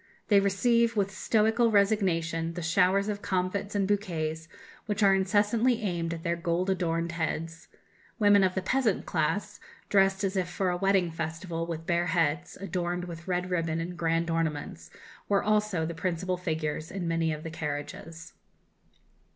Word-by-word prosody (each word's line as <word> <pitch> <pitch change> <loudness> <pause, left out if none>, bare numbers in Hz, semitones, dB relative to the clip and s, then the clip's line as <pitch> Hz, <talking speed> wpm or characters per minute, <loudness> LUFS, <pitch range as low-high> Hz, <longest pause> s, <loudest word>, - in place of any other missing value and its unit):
They 205 -2 +6
receive, 230 +4 +2
with 200 -2 +1
stoical 220 +3 +2
resignation, 170 -6 +1
the 175 - -4
showers 185 +4 +3
of 205 -1 -3
comfits 190 +2 -2
and 200 -1 +1
bouquets 165 -6 -2 0.4
which 210 0 0
are 195 -1 +6
incessantly 210 +5 +2
aimed 170 -4 -1
at 165 - -9
their 170 0 0
gold 170 +2 0
adorned 170 -2 -1
heads. 165 0 -4 0.5
Women 205 -2 +5
of 185 -1 +1
the 190 - -1
peasant 240 -1 +1
class, 200 +5 -1 0.3
dressed 195 0 +3
as 195 0 -1
if 185 -2 0
for 180 0 0
a 175 - -1
wedding 190 -2 +2
festival, 165 +1 -4
with 165 -1 -5
bare 175 +1 +1
heads, 165 -1 0
adorned 180 -2 -3
with 170 -1 -9
red 180 0 -1
ribbon 165 -2 0
and 175 +2 -4
grand 165 0 0
ornaments, 150 - -3 0.4
were 200 -1 +3
also 210 -5 +1
the 170 - -4
principal 180 +1 -2
figures 160 -3 -3
in 185 -3 -4
many 165 -1 +1
of 155 0 -5
the 165 - -6
carriages.... 160 +2 -6
180 Hz, 160 wpm, -28 LUFS, 165-200 Hz, 0.5 s, They